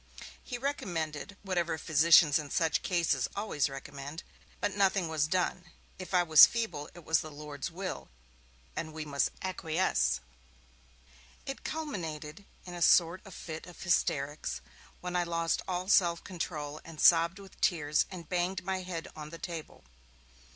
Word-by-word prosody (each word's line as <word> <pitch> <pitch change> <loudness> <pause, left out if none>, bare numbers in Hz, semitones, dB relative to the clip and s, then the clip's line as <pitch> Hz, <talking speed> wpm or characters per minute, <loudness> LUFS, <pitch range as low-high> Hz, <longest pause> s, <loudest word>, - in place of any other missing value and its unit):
He 245 - -5
recommended, 195 - -3
whatever 175 -4 0
physicians 155 -1 +6
in 150 -2 -6
such 165 +1 +1
cases 165 -8 +1
always 200 -9 0
recommend, 140 +3 -7 0.4
but 205 - -1
nothing 195 -3 +2
was 155 -2 +1
done. 180 0 0 0.3
If 185 - -7
I 180 - +5
was 160 -3 +10
feeble 195 -11 -3
it 175 -3 -12
was 160 - +3
the 155 - -7
Lord's 145 -1 -6
will, 185 +2 -5 0.7
and 160 -1 -4
we 155 -1 -5
must 140 -2 +1
acquiesce. 180 - +1 1.3
It 270 - -6
culminated 170 - -5 0.2
in 180 - -8
a 175 - -6
sort 170 +2 +5
of 190 - -10
fit 160 +1 -7
of 180 - -13
hysterics, 145 -4 0 0.4
when 180 0 -4
I 180 - +3
lost 165 -1 0
all 180 0 -2
self 170 -4 +4
control, 155 -5 -5
and 165 -2 -11
sobbed 170 +2 +6
with 195 -1 -14
tears, 150 -7 +2
and 175 -4 -8
banged 180 +2 -1
my 190 0 -2
head 180 -3 -5
on 150 -1 -7
the 165 - -8
table. 165 -2 -7
170 Hz, 150 wpm, -31 LUFS, 155-185 Hz, 1.3 s, was